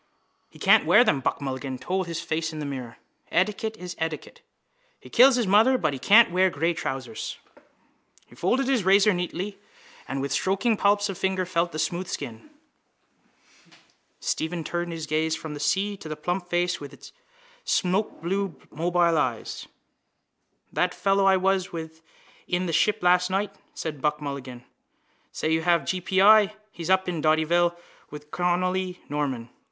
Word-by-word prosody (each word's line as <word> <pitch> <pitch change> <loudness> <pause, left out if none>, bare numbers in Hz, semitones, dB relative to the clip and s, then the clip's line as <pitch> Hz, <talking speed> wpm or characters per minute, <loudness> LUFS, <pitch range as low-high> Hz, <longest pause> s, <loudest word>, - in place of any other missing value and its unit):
—He - - -17
can't - - +4
wear 245 - +7
them, 145 - +2
Buck 135 - -2
Mulligan 130 -1 -4
told 185 +5 -2
his 165 -1 -4
face 160 -1 -2
in 155 - -8
the 150 - -4
mirror. 130 -4 -6 0.3
Etiquette 215 +3 0
is 180 -2 -7
etiquette. 160 -2 -5 0.6
He - - -15
kills 255 +2 +7
his 245 -2 +1
mother 220 +7 +5
but 155 - 0
he 135 - -5
can't 210 - +6
wear 185 +1 +3
grey 165 +2 0
trousers. 130 -7 -5 0.9
He - - -21
folded 245 - 0
his 260 -6 +2
razor 195 +2 +5
neatly 180 +3 -4 0.5
and 135 - -3
with 140 0 -3
stroking 195 - +1
palps 205 0 +2
of 195 -3 -6
fingers 190 -1 -1
felt 170 -1 0
the 155 - -6
smooth 175 +3 -2
skin. 120 - -7 1.7
Stephen 165 +1 -2
turned 175 +1 -3
his 165 -2 -5
gaze 155 +1 0
from 155 -2 -7
the 145 - -7
sea 195 +7 +1
and 200 -1 -10
to 155 - -8
the 155 - -4
plump 175 +4 -3
face 175 0 0
with 145 -1 -9
its 140 0 -13 0.5
smokeblue 190 -1 -1 0.2
mobile 170 0 +2
eyes. 120 -3 -3 1.1
—That - - 0
fellow 195 0 +2
I 190 -1 +5
was 190 0 0
with 160 -1 -7 0.5
in 180 +1 0
the 170 - -3
Ship 210 +6 +3
last 180 +1 +4
night, 200 +1 -1 0.2
said 150 -4 -5
Buck 150 +1 0
Mulligan, 135 -4 -7 0.7
says 155 - -2
you 160 0 +2
have 170 -3 +2
g. 185 +4 -2
p. 190 +1 +2
i. 215 0 +6 0.2
He's 170 -3 -7
up 190 0 +3
in 170 -3 -2
Dottyville 170 +3 +2 0.3
with 150 0 -11
Connolly 180 +1 -1
Norman. 135 -5 -3
175 Hz, 170 wpm, -25 LUFS, 155-190 Hz, 1.7 s, wear